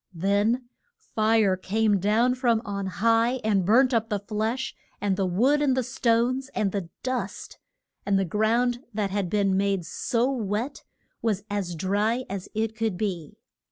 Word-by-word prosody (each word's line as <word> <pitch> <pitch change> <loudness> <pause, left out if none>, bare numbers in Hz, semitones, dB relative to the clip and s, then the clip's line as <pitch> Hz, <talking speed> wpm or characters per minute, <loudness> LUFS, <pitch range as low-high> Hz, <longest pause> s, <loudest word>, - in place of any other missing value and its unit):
Then 205 +7 +1 0.3
fire 215 -3 +2
came 205 +2 +1
down 220 +6 +3
from 240 -3 +1
on 200 -2 -3
high 225 +6 +2
and 205 -3 +2
burnt 250 +7 +4
up 225 -1 +1
the 210 - 0
flesh, 220 +5 -3 0.2
and 200 -2 0
the 190 -1 0
wood 255 +12 +2
and 265 -3 +2
the 260 - +2
stones, 245 +2 +1
and 200 -2 +1
the 190 -4 -4
dust; 255 0 -4 0.4
and 200 -1 +2
the 195 - +1
ground 230 +6 +1 0.2
that 205 -3 -1
had 195 -3 -1
been 195 -1 +2
made 195 -2 0
so 240 +8 0
wet 230 +2 -3 0.4
was 210 -4 0
as 190 -4 -2
dry 205 +8 0
as 195 -2 -5
it 220 0 -1
could 220 -4 -1
be. 180 -7 -4
215 Hz, 160 wpm, -26 LUFS, 195-235 Hz, 0.4 s, burnt